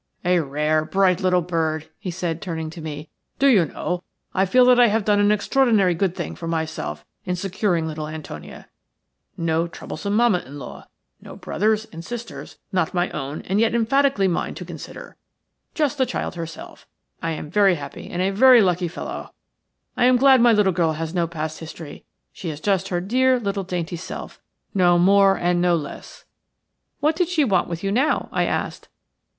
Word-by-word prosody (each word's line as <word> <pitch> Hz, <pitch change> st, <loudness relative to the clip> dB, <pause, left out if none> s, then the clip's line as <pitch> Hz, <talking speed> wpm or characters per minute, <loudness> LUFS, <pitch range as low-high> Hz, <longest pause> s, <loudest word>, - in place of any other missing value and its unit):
"A 180 Hz, 0 st, +3 dB
rare, 150 Hz, +1 st, 0 dB
bright 185 Hz, +2 st, +2 dB
little 180 Hz, -1 st, +2 dB
bird," 160 Hz, -2 st, -2 dB
he 185 Hz, -, -5 dB
said, 170 Hz, -2 st, -3 dB
turning 160 Hz, -4 st, -4 dB
to 165 Hz, -, -9 dB
me. 150 Hz, -1 st, -7 dB, 0.3 s
"Do 275 Hz, -, +1 dB
you 220 Hz, -11 st, +5 dB
know, 180 Hz, +4 st, -4 dB, 0.3 s
I 190 Hz, 0 st, +2 dB
feel 250 Hz, +6 st, +5 dB
that 250 Hz, 0 st, +6 dB
I 240 Hz, -, +7 dB
have 215 Hz, -1 st, 0 dB
done 205 Hz, -1 st, +3 dB
an 205 Hz, 0 st, +4 dB
extraordinarily 210 Hz, -3 st, +3 dB
good 185 Hz, +1 st, -1 dB
thing -, -, -4 dB
for 165 Hz, -, -7 dB
myself 155 Hz, -, -3 dB, 0.2 s
in 180 Hz, -, -2 dB
securing 185 Hz, -2 st, -1 dB
little 155 Hz, -1 st, -4 dB
Antonia. 155 Hz, 0 st, -9 dB, 0.7 s
No 165 Hz, 0 st, 0 dB
troublesome 200 Hz, +4 st, -5 dB
mamma 230 Hz, -5 st, +4 dB
in 140 Hz, 0 st, -11 dB
law 130 Hz, -4 st, -10 dB, 0.2 s
– -, -, -48 dB
no -, -, -11 dB
brothers 215 Hz, +1 st, 0 dB
and 165 Hz, +1 st, -8 dB
sisters, 240 Hz, +3 st, -8 dB
not 180 Hz, -2 st, 0 dB
my 175 Hz, +1 st, 0 dB
own 145 Hz, -1 st, -5 dB
and 195 Hz, +3 st, 0 dB
yet 230 Hz, +1 st, +2 dB
emphatically 235 Hz, -2 st, +2 dB
mine 175 Hz, -, -2 dB
to -, -, -7 dB
consider -, -, -10 dB, 0.3 s
– -, -, -53 dB
just 295 Hz, -3 st, 0 dB
the 260 Hz, -, +3 dB
child 255 Hz, -, -3 dB
herself. 165 Hz, -2 st, -9 dB, 0.3 s
I 165 Hz, -1 st, -1 dB
am 155 Hz, -1 st, -7 dB
very 195 Hz, -2 st, +4 dB
happy 140 Hz, -3 st, -8 dB
and 180 Hz, +1 st, -2 dB
a 195 Hz, -, +1 dB
very 250 Hz, +5 st, +7 dB
lucky 180 Hz, -1 st, +1 dB
fellow. 170 Hz, -, -7 dB, 0.6 s
I -, -, +3 dB
am 250 Hz, 0 st, +5 dB
glad 265 Hz, -1 st, +6 dB
my 240 Hz, 0 st, +6 dB
little 210 Hz, -4 st, +3 dB
girl 165 Hz, -2 st, +1 dB
has 160 Hz, +1 st, -4 dB
no 170 Hz, -2 st, +1 dB
past 155 Hz, -1 st, -5 dB
history. 160 Hz, -2 st, -10 dB, 0.3 s
She 175 Hz, -, -6 dB
is 150 Hz, -2 st, -6 dB
just 195 Hz, +1 st, 0 dB
her 175 Hz, -2 st, -1 dB
dear 255 Hz, +6 st, +2 dB
little, 200 Hz, -3 st, -2 dB
dainty 175 Hz, -1 st, -4 dB
self, 170 Hz, -, -8 dB, 0.3 s
no 175 Hz, -2 st, +4 dB
more 195 Hz, +2 st, +5 dB
and 175 Hz, 0 st, +1 dB
no 175 Hz, -1 st, +3 dB
less." 150 Hz, -4 st, -7 dB, 0.8 s
"What 305 Hz, +2 st, +2 dB
did 350 Hz, 0 st, 0 dB
she 330 Hz, -4 st, +2 dB
want 195 Hz, -9 st, +2 dB
with 170 Hz, +1 st, -5 dB
you 195 Hz, -, 0 dB
now?" 260 Hz, +8 st, +1 dB
I -, -, +1 dB
asked. -, -, -3 dB
180 Hz, 190 wpm, -22 LUFS, 165-210 Hz, 0.8 s, I